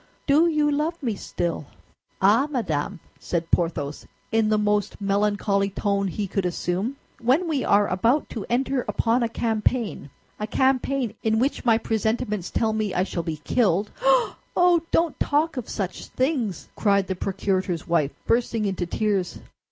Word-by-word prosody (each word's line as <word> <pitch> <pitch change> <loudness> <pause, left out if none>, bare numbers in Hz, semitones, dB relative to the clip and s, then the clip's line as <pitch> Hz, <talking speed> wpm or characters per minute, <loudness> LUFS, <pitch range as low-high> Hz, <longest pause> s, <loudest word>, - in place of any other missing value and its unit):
Do 305 +4 +5
you 300 -2 +2
love 305 +4 0
me 235 -4 0
still?" 170 -6 -3 0.5
"Ah, 210 +8 +4
madame," 195 - -2 0.2
said 165 -1 -3
Porthos, 150 -4 -1 0.2
in 225 -1 +2
the 215 - +3
most 210 -1 0
melancholy 200 0 +1
tone 200 0 0
he 200 +3 -3
could 195 0 -2
assume, 180 +7 -2 0.2
"when 265 +9 +2
we 295 -5 0
are 205 0 +4
about 230 - +1
to 220 - -5
enter 255 +1 +1
upon 235 +2 +1
a 235 - +1
campaign—a 220 - -2
campaign, 260 -1 +1
in 220 0 +1
which 260 +4 0
my 225 -2 +5
presentiments 220 -3 -1
tell 220 -1 0
me 215 -3 -1
I 180 - +3
shall 185 -2 -3
be 160 -1 -4
killed—" 205 -4 +1 0.7
"Oh, 355 -2 +5
don't 330 -1 +1
talk 305 +2 +1
of 250 -4 -5
such 190 -3 -4
things!" 255 - -1
cried 200 -2 +2
the 190 - -2
procurator's 185 -2 -2
wife, 165 -5 +2 0.2
bursting 230 -2 +1
into 190 -3 -2
tears. 200 -2 -1
215 Hz, 150 wpm, -24 LUFS, 190-250 Hz, 0.7 s, Do